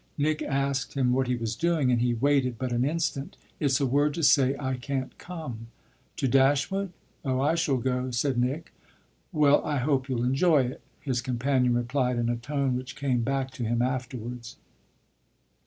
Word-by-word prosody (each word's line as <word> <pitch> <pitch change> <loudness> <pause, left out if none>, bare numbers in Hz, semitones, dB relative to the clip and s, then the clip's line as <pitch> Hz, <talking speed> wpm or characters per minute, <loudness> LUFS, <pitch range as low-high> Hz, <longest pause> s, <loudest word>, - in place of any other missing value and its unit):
Nick 155 +1 0
asked 140 -1 -1
him 125 -2 +2
what 130 0 +1
he 125 - +1
was 115 -1 -3
doing, 165 -4 +1
and 120 -1 +2
he 120 -1 +1
waited 130 -1 +2
but 130 +1 -3
an 120 +1 +1
instant. 150 -1 -2 0.2
"It's 140 -2 +2
a 140 - +2
word 145 +3 +2
to 165 - -3
say 135 -1 +5
I 130 -2 -2
can't 130 +1 -4
come." 140 -11 -7 0.5
"To 135 - 0
Dashwood? 140 +9 +2 0.3
Oh 130 -3 0
I 145 +4 +2
shall 165 -5 +1
go," 125 +1 -1
said 125 +1 0
Nick. 135 +7 -2 0.6
"Well, 145 -1 +4
I 150 -1 -1
hope 135 0 0
you'll 120 -2 0
enjoy 140 +3 +3
it!" 125 +5 -5 0.2
his 130 -4 -1
companion 125 0 +1
replied 125 +1 0
in 120 0 0
a 120 - +1
tone 135 +2 -1
which 130 +1 -5
came 130 -4 0
back 135 +1 -1
to 125 - -6
him 120 +1 +1
afterwards. 125 -2 -4
130 Hz, 180 wpm, -27 LUFS, 125-140 Hz, 0.6 s, say